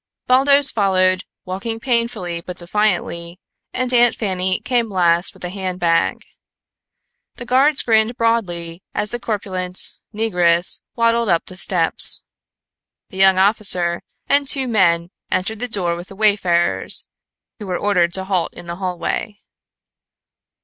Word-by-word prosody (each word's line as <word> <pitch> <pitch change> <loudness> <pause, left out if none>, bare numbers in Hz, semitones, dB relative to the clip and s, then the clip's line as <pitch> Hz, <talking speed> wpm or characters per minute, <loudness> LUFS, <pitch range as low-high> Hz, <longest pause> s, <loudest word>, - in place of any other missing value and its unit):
Baldos 275 +2 +4
followed, 185 -2 +1 0.2
walking 195 +5 -5
painfully 230 -8 -2
but 180 +1 -9
defiantly, 175 -2 -2 0.3
and 255 0 -2
Aunt 240 -1 +4
Fanny 185 -3 -1
came 240 -3 -1
last 175 -2 +2
with - - -13
the 180 - -4
handbag. 180 -3 -1 1.1
The 240 - -9
guards 270 +4 +3
grinned 225 +1 +2
broadly 180 -7 -1
as 210 - -2
the 240 - -3
corpulent 185 -5 -4 0.3
negress 180 -6 +1
waddled 230 -1 +1
up 170 -2 +1
the 185 - -9
steps. 180 -3 +2 0.9
The 190 - -11
young 190 0 +5
officer 190 -4 +2 0.3
and 280 0 +2
two 270 -1 +1
men 175 -6 +2 0.2
entered 195 +4 -2
the 245 - -3
door 180 -7 -1
with 175 +2 -9
the 195 - -12
wayfarers, 195 -5 +2 0.5
who 210 - -8
were 180 -1 -2
ordered 180 -4 +1
to 190 - -1
halt 185 -3 -2
in - - -10
the 170 0 -6
hallway. 190 +3 -4
190 Hz, 135 wpm, -19 LUFS, 175-230 Hz, 1.1 s, young